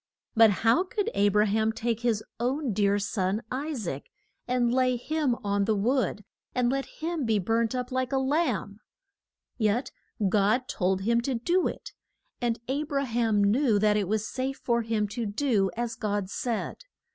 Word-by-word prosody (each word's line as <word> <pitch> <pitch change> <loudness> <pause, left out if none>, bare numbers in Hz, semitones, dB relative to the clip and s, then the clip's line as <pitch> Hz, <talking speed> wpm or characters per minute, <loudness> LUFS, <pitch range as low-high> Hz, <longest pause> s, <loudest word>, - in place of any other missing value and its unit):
But 225 -1 +7 0.2
how 230 +11 +5
could 420 +2 -2
A 205 0 +3
bra 210 +1 +3
ham 220 +1 +1
take 230 0 -2
his 235 -3 0 0.2
own 255 +1 0
dear 200 0 +2
son, 200 +1 -1
I 275 +5 -2
saac, 170 - -4 0.4
and 245 -1 +1
lay 255 -1 +3
him 295 0 0
on 200 0 +1
the 220 0 +2
wood, 220 -1 0 0.3
and 250 -1 +2
let 275 0 -1
him 325 -1 -4
be 225 -3 +2
burnt 225 +4 0
up 250 0 -3
like 255 -1 -1
a 270 - +1
lamb? 265 - 0 0.8
Yet 220 +4 +1 0.4
God 210 +6 +2
told 190 0 0
him 235 +3 +2
to 260 +1 -1
do 345 +10 +1
it, - - -7 0.5
and 235 -1 0
A 275 +3 0
bra 280 -2 -1
ham 225 -4 +1
knew 225 +2 +3
that 210 0 +3
it 205 -3 0
was 215 +1 -1
safe 265 +1 -3
for 235 -1 +2
him 220 -2 0
to 230 +2 -3
do 205 -3 +1
as 235 -1 -2
God 205 -4 -2
said. 235 0 -2
230 Hz, 180 wpm, -27 LUFS, 210-255 Hz, 0.8 s, But